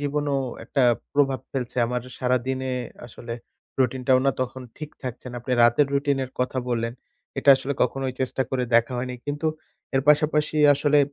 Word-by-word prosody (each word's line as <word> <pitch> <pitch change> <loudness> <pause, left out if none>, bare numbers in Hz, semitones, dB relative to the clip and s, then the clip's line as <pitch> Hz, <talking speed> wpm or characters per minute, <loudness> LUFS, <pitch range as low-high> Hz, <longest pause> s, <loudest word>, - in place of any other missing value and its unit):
জীবনেও 145 0 -1 0.3
একটা 135 - 0 0.3
প্রভাব 135 -3 +2
ফেলছে। 125 -3 -4
আমার 125 +1 -2 0.2
সারাদিনে 130 +1 -1 0.3
আসলে 115 0 -8 0.4
routine-টাও 130 0 +2
না 135 - +5
তখন 130 0 -3 0.2
ঠিক 155 0 -6
থাকছে 125 -1 -6
না। - - -10
আপনি 125 +2 -3
রাতের 120 +5 +5
routine-এর 140 -2 0
কথা 130 +1 -1
বললেন। 115 -1 -1 0.5
এটা - - -2
আসলে 140 +1 -3
কখনোই 130 +1 -1
চেষ্টা 130 0 0
করে 130 -1 0
দেখা 120 +2 +4
হয়নি। 125 0 -3
কিন্তু 145 +2 -2 0.5
এর 135 - +4
পাশাপাশি 150 0 +3 0.2
আসলে 145 +1 +3
130 Hz, 155 wpm, -24 LUFS, 125-145 Hz, 0.5 s, না